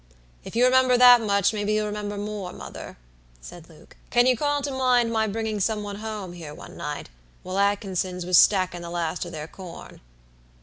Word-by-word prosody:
"If - - -10
you 245 +2 +4
remember 255 0 +4
that 245 -1 +8
much, 200 -1 +1
maybe 210 0 -1
you'll 215 0 0
remember 205 0 -4
more, 205 -3 -5
mother," - - -10 0.4
said 170 - -12
Luke. 160 0 -18
"Can 240 0 +4
you 255 0 +4
call 290 +3 -1
to 285 - -2
mind 250 -3 +2
my 220 -1 +1
bringing 215 0 -3
some 210 +2 0
one 205 -1 -6
home 210 -4 -6
here 160 -4 -9
one - - -12
night, 150 -1 -6 0.3
while 185 +2 -3
Atkinsons 190 -3 -1
was 180 0 +2
stackin' 185 -3 +3
the 170 - -7
last 170 0 -3
o' - - -7
their 155 -2 -7
corn?" 180 -1 -11
205 Hz, 190 wpm, -24 LUFS, 180-225 Hz, 0.4 s, that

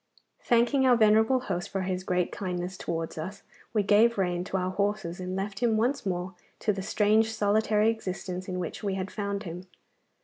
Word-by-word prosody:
Thanking 245 +3 +3
our 250 - +6
venerable 220 +3 +4
host 175 -8 -3
for 195 - -2
his 185 0 -2
great 180 -1 0
kindness 180 -1 -4
towards 165 -3 -4
us 190 +5 -6 0.3
we 210 -2 +1
gave 215 +3 +4
rein 180 -2 0
to 190 - -2
our 185 0 -1
horses, 200 -3 -1
and 185 0 -4
left 195 +1 -3
him 225 -2 +2
once 240 0 0
more 180 0 -2 0.3
to 210 - +2
the 195 - -4
strange 215 +2 +2
solitary 215 +1 +2
existence 185 -4 -5
in 185 -1 -3
which 175 -3 -4
we 200 -3 -1
had 190 0 -4
found 200 -1 -3
him. 180 0 -7
195 Hz, 190 wpm, -28 LUFS, 185-220 Hz, 0.3 s, our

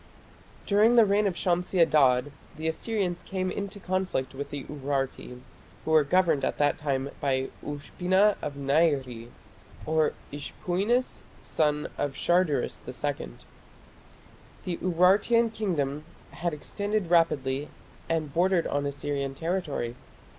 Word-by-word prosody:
During 215 +4 +4
the 230 -2 +7
reign 205 +1 +2
of 185 - -2
Shamshi 180 +1 0
Adad 145 -5 +4 0.3
the 160 +1 -3
Assyrians 180 +1 -2
came 185 -1 -3
into 200 +1 -5
conflict 185 -9 -2
with 140 +1 -6
the 145 -2 -5
Urarti, 135 -3 -3 0.5
who 160 - -1
were 155 -1 +6
governed 170 -1 +2
at - - -1
the 145 0 +4
time 140 -2 -2
by 135 -2 0
"Ushpina 185 +8 +1
of 145 -1 -4
Nairi" 140 -5 +1 0.6
(Ishpuinis, 175 - -1 0.2
son 150 -1 0
of 145 -2 -1
Sharduris 175 -6 +1
II). 130 - -3 1.4
The 175 -2 -2
Urartian 200 +6 +3
kingdom 150 -9 -1 0.3
had 175 0 -2
extended 200 +4 -3
rapidly 145 -4 +2 0.4
and 155 -3 -1
bordered 180 0 +2
on 145 0 -1
Assyrian 140 -1 -3
territory. 160 -8 -2
160 Hz, 120 wpm, -27 LUFS, 140-185 Hz, 1.4 s, the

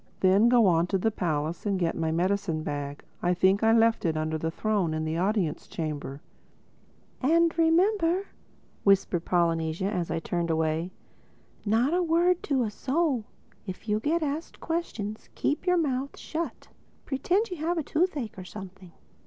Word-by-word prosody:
Then 195 +5 +5
go 240 -2 +5
on 170 -2 +3
to 195 - +1
the 220 +4 +1
palace 160 -4 -2
and 200 -2 0
get 170 -2 0
my 160 -1 -1
medicine 180 -1 0
bag. 145 -1 -4 0.2
I 180 0 +2
think 190 +3 +3
I 225 0 +4
left 225 0 +4
it 160 -2 0
under 155 0 -1
the 160 +1 -1
throne 190 -3 0
in 155 0 -2
the 160 +1 -2
Audience 190 -4 0
Chamber." 150 -3 -5 1.0
"And 330 +4 +3
remember," 345 +3 +3 0.6
Polynesia 175 -3 +2
whispered 200 - -1
as 170 - -3
I 165 - -1
turned 170 +1 -2
away, 160 +1 0 0.8
"not 235 +8 +2
a 360 - +2
word 345 +1 +2
to 270 -4 +1
a 215 - -2
soul. 270 -1 0 0.4
If 185 +4 -7
you 210 0 +1
get 315 +7 0
asked 300 +3 -4
questions, 225 - -4
keep 300 +5 -1
your 360 0 +4
mouth 275 -4 -1
shut. 330 +1 -5 0.4
Pretend 360 - 0
you 360 - -4
have 335 +3 -1
a 320 - 0
toothache 290 - -1
or - - -6
something." 190 -2 -10
205 Hz, 165 wpm, -27 LUFS, -, 1.0 s, Then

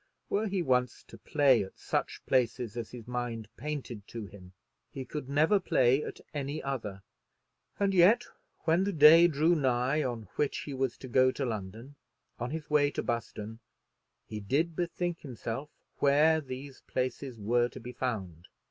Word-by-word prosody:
Were 215 +2 +1
he 195 -3 -1
once 125 -3 +1
to - - -11
play 140 -7 +3
at 95 - -11
such - - -3
places 120 -3 +1
as 120 -2 -4
his 120 -2 -10
mind 120 -3 -3
painted 130 -7 -5
to 115 -2 -6
him 95 -2 -13 0.4
he 135 -3 -6
could 140 0 -6
never 155 +8 +4
play 130 -5 +3
at - - -7
any 145 +1 -3
other; 110 -8 -4 0.8
and 200 -1 +2
yet 190 +5 +6 0.4
when 170 +3 +2
the 200 0 -1
day 160 +2 +8
drew 160 +2 +3
nigh 130 -1 +1
on 120 -5 -3
which 145 - 0
he 145 - -6
was 130 -1 -1
to 130 - -9
go 130 +1 +4
to 140 - -2
London, 115 +5 -6 0.4
on 120 +1 -2
his 160 +2 -5
way 145 -1 +3
to - - -3
Buston, 110 -1 -4 0.7
he 110 - -6
did 150 +11 0
bethink 175 0 -2
himself 130 +1 -5 0.3
where 155 +3 +4
these 135 0 -8
places 130 -1 -3
were 120 +3 +2
to - - -10
be 125 +1 -8
found. 95 -10 -4
130 Hz, 165 wpm, -30 LUFS, 120-150 Hz, 0.8 s, day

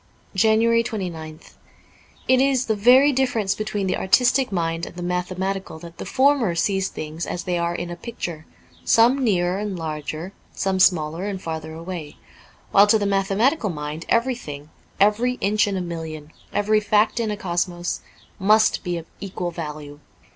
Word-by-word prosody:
^ 190 - +2
29 230 +1 +4
JANUARY - - -4 0.5
29th - - -18 0.8
IT 260 0 +5
is 265 -2 +2
the 220 - 0
very 255 +7 +6
difference 250 -7 +1
between 210 -2 -3
the 185 - 0
artistic 250 +5 +3
mind 165 -2 -1
and - - -11
the 175 - -6
mathematical 185 +1 -3
that 170 +1 -12
the - - -6
former 265 -8 +3
sees 190 +2 +1
things 155 +2 -6
as 175 - -4
they 180 - -1
are 170 0 -1
in 175 0 -4
a - - -4
picture, 170 -6 -6 0.4
some 245 +4 +4
nearer 185 -4 +1
and 205 -3 -3
larger, 155 +2 -5 0.2
some 190 -1 -1
smaller 165 -1 +2
and 200 -2 -3
farther 160 -1 -5
away: 165 -2 -7 0.5
while 200 +1 +6
to 220 - +5
the 205 - -1
mathematical 200 +6 +1
mind 150 0 -5
everything, 230 - -1 0.3
every 210 +5 +3
inch 210 -3 +1
in 200 -1 -1
a - - -2
million, 160 -3 -6 0.2
every 215 +1 +2
fact 210 +2 +2
in 225 -2 0
a 210 - -3
cosmos, 175 -2 -2 0.4
must 215 +3 +3
be 175 -3 -2
of 165 - -7 0.2
equal 180 -3 -4
value. 150 -3 -7
190 Hz, 170 wpm, -23 LUFS, 170-220 Hz, 0.8 s, very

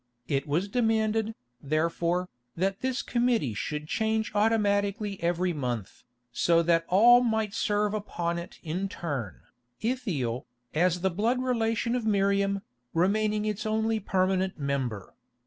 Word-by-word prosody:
It 140 0 -1
was 165 +7 0
demanded, 220 -1 +1 0.3
therefore, 170 +4 0 0.3
that 190 +3 0
this 260 0 -1
committee 235 - +1
should 150 +8 -4
change 220 +4 0
automatically 205 -1 +1
every 175 +1 +1
month, 120 - -4 0.3
so 170 +6 +3
that 165 0 +2
all 240 +6 +7
might 220 -4 0
serve 210 -1 +1
upon 170 -5 -2
it 170 - -9
in 180 +5 -2
turn, 120 - -4 0.4
Ithiel, 165 - -2 0.3
as 175 +2 +2
the 190 0 +1
blood 230 +8 0
relation 230 -2 0
of 235 -3 -1
Miriam, 200 -1 +2 0.3
remaining 210 +4 +2
its 210 -1 -2
only 220 +1 0
permanent 190 -1 0
member. 135 - -3
195 Hz, 130 wpm, -28 LUFS, 165-220 Hz, 0.4 s, all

